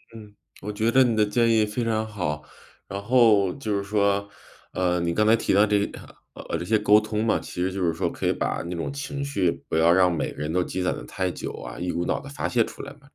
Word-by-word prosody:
嗯。 105 -2 -12 0.3
我 105 - -4
觉 110 +2 0
得 130 +2 +6
你 120 -3 +1
的 110 - +4
建 115 +2 +2
议 110 -1 +4
非 105 +3 -3
常 110 -1 0
好。 90 -8 -3 0.4
然 100 +1 -5
后 110 -5 +4
就 110 -7 -3
是 100 - -2
说， 100 0 +1 0.4
呃， 90 -1 0
你 85 0 0
刚 105 +5 +2
才 110 - +6
提 - - 0
到 100 +2 +5
这 105 -1 +2
个 - - -9
嗯， - - -13 0.4
呃， - - -1
这 85 - -5
些 110 +4 +2
沟 105 0 +5
通 110 0 -2
嘛， 110 - +2
其 90 - -6
实 90 - +1
就 95 0 -4
是 85 -1 +1
说 80 - -1
可 - - -6
以 - - +3
把 - - -2
那 85 +1 -5
种 85 - -3
情 140 0 -5
绪 95 -11 +1 0.2
不 - - -3
要 80 +1 +5
让 90 0 +4
每 80 - -2
个 - - -14
人 75 +1 -2
都 90 0 +2
积 95 - -4
攒 90 - 0
得 - - -8
太 90 +9 -2
久 - - -5
啊， 60 -1 -8
一 90 0 -2
股 85 - -2
脑 - - -1
地 140 - -10
发 140 - -3
泄 120 -2 +2
出 - - -9
来 140 - -8
嘛， 145 - -23
105 Hz, 295 characters per minute, -25 LUFS, 90-110 Hz, 0.4 s, 得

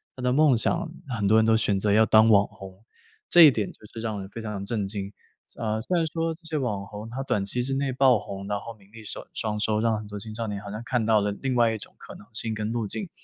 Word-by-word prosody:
他 130 - -9
的 125 - +2
梦 145 -2 +4
想， 160 +7 0 0.2
很 105 -5 -1
多 110 +2 +5
人 110 - +4
都 110 0 +4
选 105 -3 +1
择 105 +1 +1
要 110 +2 +5
当 110 +1 +5
网 100 -2 +5
红。 95 -2 -13 0.5
这 175 - +7
一 155 -4 +10
点 105 -4 -2
就 - - -20
是 115 - -7
让 110 -2 -3
人 95 - -9
非 115 - -8
常 105 -2 -5
地 100 - -6
震 105 -3 -2
惊。 100 -1 -4 0.5
啊， 110 -1 -1
虽 175 +10 0
然 165 -1 +1
说 165 +1 -2
这 160 - -15
些 160 -1 -2
网 105 -8 -2
红 105 +2 -8
他 130 +3 -5
短 105 -6 0
期 120 +5 -1
之 135 +2 -1
内 135 0 -1
爆 130 -2 +4
红， 100 -1 -7
然 105 0 -1
后 115 +3 -8
名 100 -2 -23
利 115 -1 -11
收 - - -7
双 105 -1 -3
收， 110 0 +1
让 115 -1 +1
很 105 0 -8
多 105 0 -7
青 110 +2 -6
少 115 0 -4
年 105 -1 -4
好 100 -1 -8
像 105 +2 -5
看 125 -4 0
到 110 -1 +4
了 105 0 -1
另 130 -2 -1
外 115 -2 +3
一 - - -3
种 - - -10
可 - - -12
能 - - -14
性 110 +1 +3
跟 110 0 -3
路 115 -3 -2
径。 190 - -3
110 Hz, 315 characters per minute, -26 LUFS, 105-125 Hz, 0.5 s, 一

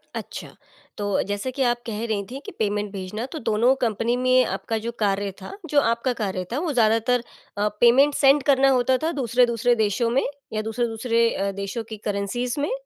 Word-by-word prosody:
अच्छा, - - -7 0.4
तो 205 -1 0
जैसे 205 +5 -3
कि 265 +1 -1
आप 240 -1 +1
कह 225 -1 -4
रही 215 -3 -1
थी 265 - -5
कि - - -6
पेमेंट 205 -1 -1
भेजना, 200 +4 -5
तो 315 +4 -7
दोनों 230 +2 +3
कंपनी 230 0 0
में 255 0 +4
आपका 225 - -3
जो 235 - -2
कार्य 200 -1 0
था, 190 - -8 0.2
जो 290 - +4
आपका 235 +1 0
कार्य 190 -3 -2
था 275 - 0
वो 330 -3 -2
ज़्यादातर 230 +1 +2 0.3
अ, 205 +1 +1
पेमेंट 265 +5 +6
सेंड 280 0 +4
करना 275 -1 +4
होता 260 0 +3
था 330 - +1
दूसरे-दूसरे 240 0 +2
देशों 220 +1 +1
में 255 +4 +2 0.3
या 215 - -1
दूसरे-दूसरे 230 +1 0
अ, 200 0 -1
देशों 200 +4 -4
की 220 - -6
करेंसीज़ 215 +6 -2
में? 290 - -1
235 Hz, 190 wpm, -23 LUFS, 210-255 Hz, 0.4 s, पेमेंट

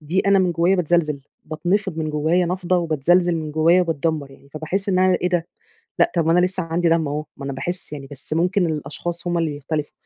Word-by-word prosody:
دي 160 +5 0
أنا 200 0 +5
من 180 -2 +2
جوّايا 170 +4 +2
باتزلزل. 165 -4 +1 0.2
باتنفض 175 +3 -1
من 155 -1 -2
جوّايا 160 +4 +1
نَفضَة، 180 0 0
وباتزلزل 170 +2 +2
من 155 -1 -4
جوّايا 165 +4 +4
وباتدمّر 160 -3 -1
يعني 140 +1 -18
فباحس 160 +7 -3
إن 185 -2 +2
أنا 185 0 +4
إيه 180 - +1
ده! 175 -2 0 0.5
لأ، - - +3
طب 170 -3 +1
ما 165 - +4
أنا 180 - +4
لسّه 185 0 -4
عندي 170 +1 0
دم 165 -2 +2
أهو، 150 +2 -3
ما 140 - -8
أنا 140 - -3
باحس 175 +4 -5
يعني، 140 -2 -7
بس 140 +2 -11
ممكن 180 +3 +2
الأشخاص 165 +3 -5
هم 175 0 0
اللي 165 -2 0
بيختلفوا. 145 +1 -4
165 Hz, 220 wpm, -21 LUFS, 155-180 Hz, 0.5 s, أنا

